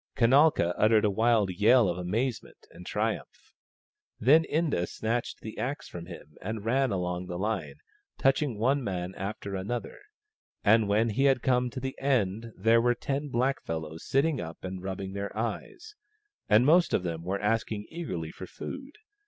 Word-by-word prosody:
Kanalka 130 - +4
uttered 110 0 +4
a 105 - +2
wild 110 -1 +2
yell 110 +5 +5
of 90 0 -2
amazement 110 +7 -3
and 90 +1 -12
triumph. - - -3 0.7
Then 155 +7 +5
Inda 150 - 0
snatched 115 +2 -3
the 110 - -8
axe 140 +3 -3
from 85 -1 -8
him 75 -4 -11
and 110 +1 -5
ran 130 +4 +2
along 90 -2 -2
the 90 -1 -4
line, 105 +2 -2 0.4
touching 135 -3 +1
one 130 +5 +1
man 90 -3 -3
after 100 0 -5
another; 110 - -4 0.6
and 110 0 +5
when 110 +3 +3
he 135 +7 +1
had 135 -3 +3
come 125 -1 +2
to 130 - -6
the 130 +1 -4
end 115 -5 0
there 115 +1 +4
were 120 +1 +2
ten 140 +4 -3
blackfellows 80 - -2
sitting 140 +2 +1
up 80 -1 -8
and 95 -1 -5
rubbing 95 0 -5
their 100 0 -5
eyes, 435 -1 -4 0.6
and 110 +4 +5
most 170 +4 +5
of 90 - 0
them 85 -2 -3
were 95 +3 -2
asking 105 0 -1
eagerly 90 - -4
for 95 - -9
food. 275 - -8
110 Hz, 165 wpm, -28 LUFS, 95-130 Hz, 0.7 s, yell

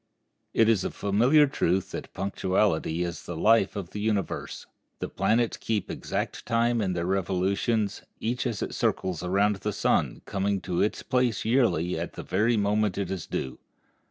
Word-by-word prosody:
It 115 - +5
is 110 -5 +3
a - - -1
familiar 120 +10 +4
truth 95 -8 0
that - - -6
punctuality 95 -3 0
is 85 -1 -5
the 85 - -5
life 110 +2 +4
of 95 -4 -5
the 105 - -5
universe. 105 -2 -2 0.3
The - - -4
planets 115 +1 +1
keep 105 -4 -2
exact - - -3
time 115 0 +2
in 95 -3 0
their 85 -1 -2
revolutions, 95 +3 0 0.2
each 120 +3 -1
as 115 -4 -2
it - - -4
circles 90 -3 -1
around 100 +3 +2
the - - -3
sun - - 0
coming 100 0 -1
to 90 -2 -1
its 105 - 0
place 125 -5 0
yearly 110 -8 +2
at - - -4
the - - -7
very 110 +5 +1
moment 105 -1 +1
it 95 -2 -2
is 95 -4 -4
due. 65 - -4
100 Hz, 170 wpm, -27 LUFS, 95-115 Hz, 0.3 s, It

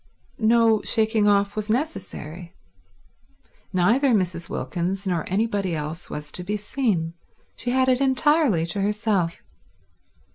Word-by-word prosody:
No 225 -1 +4
shaking 220 -1 +2
off 200 0 +2
was 215 0 -3
necessary. 185 - -4 1.2
Neither 230 +8 +3
Mrs. 175 -3 -1
Wilkins 185 +3 -3
nor 175 -4 -1
anybody 200 -3 0
else 155 +2 -5
was 150 0 -6
to 180 - -4
be 205 +4 -2
seen. 205 -7 -1 0.4
She 245 - -4
had 260 +1 +2
it 255 0 +3
entirely 270 - +3
to 170 +4 -2
herself. 205 -4 0
205 Hz, 120 wpm, -24 LUFS, 175-230 Hz, 1.2 s, No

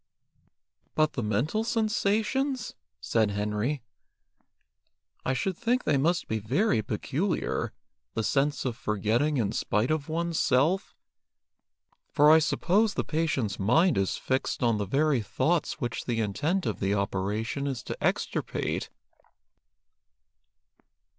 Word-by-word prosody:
"But 155 -1 +2
the 130 - -2
mental 120 - 0
sensations 225 +3 0
?" - - -59
said 110 - +1
Henry. 105 +6 -2 1.4
"I 135 - 0
should 185 +8 -1
think 245 +6 0
they 145 -3 +2
must 170 +5 +1
be 110 - -1
very 125 - +1
peculiar, 140 - -2 0.4
the 110 - 0
sense 140 +3 +1
of 125 -3 -1
forgetting 115 +8 0
in 105 -5 +1
spite 105 +7 0
of 155 -1 -1
one's 170 +1 -1
self, 160 +10 +2 1.1
for 150 0 +5
I 160 - +8
suppose 200 +7 +2
the - - 0
patient's 150 -10 -1
mind 160 - +4
is 95 -1 0
fixed 130 -1 -1
on 115 -3 +2
the 100 - -2
very 140 +2 +2
thoughts 165 - 0
which 120 -5 -3
the 120 -2 -1
intent 150 - 0
of - - -2
the 100 +1 +1
operation 105 +7 -2
is 130 -4 -3
to - - -6
extirpate." - - -1
140 Hz, 125 wpm, -28 LUFS, 110-170 Hz, 1.4 s, I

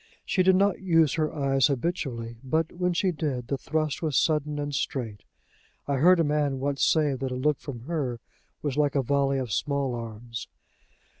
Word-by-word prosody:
She 185 - +1
did 185 0 +5
not 195 0 +2
use 165 -6 +3
her 155 -2 0
eyes 135 -3 +2
habitually, 125 -6 -3
but, 160 +4 0
when 180 0 0
she 180 +2 +1
did, 140 -7 -3
the 140 - 0
thrust 155 -2 -1
was 155 -4 0
sudden 150 -2 +1
and 145 0 -3
straight. 120 -6 -3 0.6
I 140 -1 0
heard 175 +6 +6
a - - +4
man 145 -2 +1
once 140 0 -1
say 150 -3 +3
that 130 0 -3
a - - -2
look 145 +3 +1
from 130 -5 -7
her 135 -4 -3 0.4
was 145 -2 -2
like 145 -1 +2
a 135 - +2
volley 140 +1 +1
of 125 -5 -3
small 140 0 0
arms. 115 0 -6
145 Hz, 190 wpm, -27 LUFS, 130-155 Hz, 0.6 s, heard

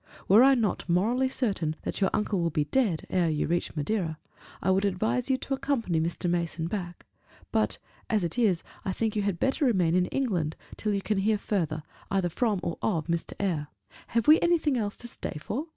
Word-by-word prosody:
Were 205 +5 +7
I 270 0 +7
not 220 -6 -1
morally 235 +9 +2
certain 195 - -1
that - - -4
your 190 - +4
uncle 210 -2 0
will 170 - +1
be 150 -1 0
dead 195 - 0
ere 175 -3 +2
you 150 -1 0
reach 170 +1 -1
Madeira, 160 +1 -1 0.4
I 190 - +1
would 190 +1 +2
advise 215 +6 0
you 265 - +3
to 270 - -4
accompany 265 - 0
Mr. 170 +2 -2
Mason 170 -1 -1
back; 175 -1 -5 0.5
but - - +1 0.3
as 215 -4 +2
it 170 - -2
is, 210 -8 +2 0.2
I 190 - -1
think 220 +2 -1
you 210 - +1
had 200 -4 -1
better 270 +3 +1
remain 185 -10 +3
in 180 0 +3
England 180 - -1 0.2
till 215 - -2
you 195 - -2
can 210 -2 0
hear 210 +2 +2
further, 165 -7 -2 0.3
either 190 -2 +1
from 210 +2 0
or 170 - -3
of 165 -8 0
Mr. 170 -1 -2
Eyre. 165 -7 -1 0.4
Have 230 -1 0
we 310 +1 +8
anything 335 -5 +2
else 210 -4 -2
to 240 - -7
stay 230 - -6
for?" 270 - -4
195 Hz, 205 wpm, -28 LUFS, 170-230 Hz, 0.5 s, we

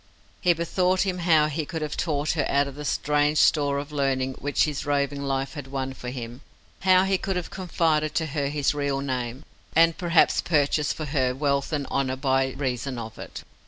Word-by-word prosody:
He 180 -2 +4
bethought 180 +2 +1
him 185 -2 -1
how 160 -3 +4
he 155 +1 -2
could 160 +1 -4
have 150 -1 -3
taught 150 -3 0
her 155 -3 0
out 140 0 +2
of 140 - -7
the 150 +2 -8
strange 150 +2 +1
store 145 -2 +3
of 145 +1 -5
learning 135 -2 0
which 145 0 +1
his 150 -2 -2
roving 140 -1 0
life 135 -1 -2
had 145 -3 -7
won 135 -1 -3
for 125 -1 -7
him, 120 0 -7 0.4
how 185 0 +5
he 190 -1 +1
could 195 - -2
have 180 -2 -4
confided 160 -4 0
to 160 - +1
her 145 -2 -2
his 145 0 0
real 140 -1 -1
name, 130 0 -4 0.3
and 165 0 +5
perhaps 170 -2 +3
purchased 150 -2 +1
for 155 - -4
her 130 -3 0
wealth 140 +1 0
and 145 -3 -1
honour 130 -1 0
by 135 -1 +1
reason 130 -1 -3
of 110 -1 -7
it. - - -8
145 Hz, 200 wpm, -25 LUFS, 135-160 Hz, 0.4 s, how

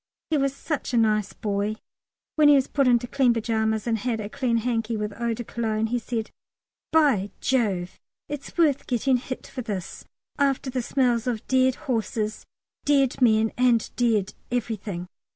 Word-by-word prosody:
He 310 - +3
was 275 0 0
such 285 -4 -3
a - - +4
nice 215 -3 +2
boy. 205 0 -2 0.6
When 305 -1 +5
he 290 - +8
was 270 -2 +3
put 275 -3 +1
into 245 -1 +4
clean 250 -1 +2
pyjamas, 220 -1 0
and 225 -2 0
had 230 0 -1
a 205 -1 -5
clean 235 0 0
hanky 230 -1 -1
with 210 0 -3
eau 235 +1 -2
de 240 - -5
Cologne, 225 -1 -1
he 240 +2 -1
said, 225 -1 -4 0.6
"By 275 -11 +3
Jove, 195 -9 0 0.3
it's 290 +2 -7
worth 300 -5 +2
getting 255 +1 +2
hit 255 +1 -6
for 255 - -6
this, 205 -6 -5 0.4
after 275 -1 +1
the 255 0 -1
smells 245 -1 +1
of 230 -3 -2
dead 260 0 +3
horses, 220 -4 -2 0.4
dead 275 -3 +2
men, 220 -2 +4
and 245 -3 +3
dead 225 -5 +1 0.2
everything." 210 -6 -3
235 Hz, 170 wpm, -25 LUFS, 220-260 Hz, 0.6 s, he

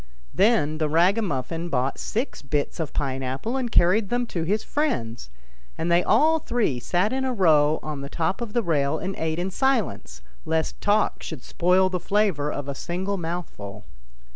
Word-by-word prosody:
Then 190 -7 +2
the 155 -1 +1
ragamuffin 170 - +1
bought 135 -2 -1
six 235 +6 -3
bits 145 +4 -2
of 160 -3 -2
pine 135 -2 -2
apple 135 - -3
and 255 -3 -2
carried 190 +4 +4
them 245 0 0
to 170 - -1
his 200 +6 0
friends, 120 - -2 0.5
and 170 +1 -1
they 175 +1 +4
all 320 +2 +4
three 230 - 0
sat 180 - 0
in 265 0 -1
a 260 - 0
row 155 -8 +4
on 150 -2 -5
the 140 - -6
top 170 +8 -1
of 230 -3 -5
the 240 - +1
rail 150 -4 +1
and 190 +3 -4
ate 160 0 -1
in 180 +2 -2
silence, 220 - -1 0.2
lest 160 0 -1
talk 210 +1 +2
should 155 -7 -7
spoil 185 +2 +3
the 185 -1 -2
flavour 180 -7 +1
of 145 -1 -5
a 140 - -2
single 185 +7 -3
mouthful. 165 - -6
175 Hz, 180 wpm, -24 LUFS, 145-210 Hz, 0.5 s, carried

